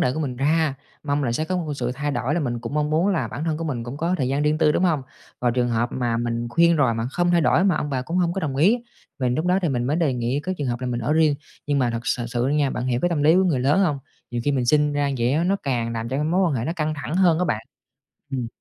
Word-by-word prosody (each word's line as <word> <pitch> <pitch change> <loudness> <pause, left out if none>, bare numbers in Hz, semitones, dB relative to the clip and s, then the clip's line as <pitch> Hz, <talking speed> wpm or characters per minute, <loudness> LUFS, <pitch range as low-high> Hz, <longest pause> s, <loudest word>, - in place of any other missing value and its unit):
đề 125 - +2
của 155 - -3
mình 130 -5 -3
ra. 150 +1 +1 0.3
Mong 145 -1 0
là 120 - 0
sẽ 155 +6 -1
có 185 +3 -2
một 175 - -2
cái 150 - -3
sự 125 -2 -2
thay 145 +1 -2
đổi 125 +2 -1
là 175 - 0
mình 120 -4 -2
cũng 120 +4 -6
mong 150 0 0
muốn 165 +5 +2
là 190 -6 0
bản 150 - -5
thân 160 -2 -1
của 165 - -4
mình 125 -7 -3
cũng 120 +4 -6
có 170 +4 0
thời 130 -2 0
gian 140 +2 0
riêng 150 +1 +1
tư, 150 -2 +4
đúng - - +1
hông? 160 -6 +1 0.4
Và 125 - +2
trường 120 0 0
hợp 120 +1 0
mà 120 -2 -1
mình 120 0 -2
khuyên 170 +5 +4
rồi 130 -6 +2
mà 115 +1 -2
không 175 +4 +1
thay 175 - +4
đổi, 165 +3 +3
mà 190 -5 +3
ông 150 - -2
bà 130 -2 -1
cũng 165 +7 -4
hổng 175 -2 +2
có 195 - -3
đồng 140 -6 -3
ý, 200 - +4 0.4
mình 125 -2 0
lúc 155 +6 -1
đó 180 +1 +3
thì 170 - +1
mình 125 -4 -1
mới 145 +5 0
đề 165 -5 +1
nghị 125 +3 -1
cái 185 +3 -2
trường 145 - -2
hợp 120 0 -2
là 130 - -3
mình 120 -1 -2
ở 120 +6 0
riêng. 155 -2 +4 0.3
Nhưng 145 -1 +1
mà 125 -3 +2
thật 115 0 -3
sờ 125 -1 -1
sự 120 0 -1
nha, 145 0 +1
bạn 125 0 -3
hiểu 125 -1 0
cái 175 - +2
tâm 165 -4 0
lý 155 +3 +5
của 190 - +4
người 155 -9 +1
lớn 145 +9 +3
hông? 155 -8 +1 0.3
Nhiều 120 -1 -2
khi 145 - +2
mình 125 -3 0
sinh 150 +1 +3
ra 145 -1 0
vậy 120 +3 +1
á, 160 +3 +1
nó 195 +3 +2
càng 120 -4 -1
làm 115 0 -3
cho 130 - -2
cái 150 - 0
mối 170 +5 +1
quan 160 - 0
hệ 115 -3 -2
nó 160 - -1
căng 155 -1 -1
thẳng 150 +4 -4
hơn 175 -4 +4
á 180 - +1
bạn. 115 -7 -2 0.6
Ừm. 130 -3 -2
145 Hz, 330 wpm, -23 LUFS, 125-160 Hz, 0.6 s, lý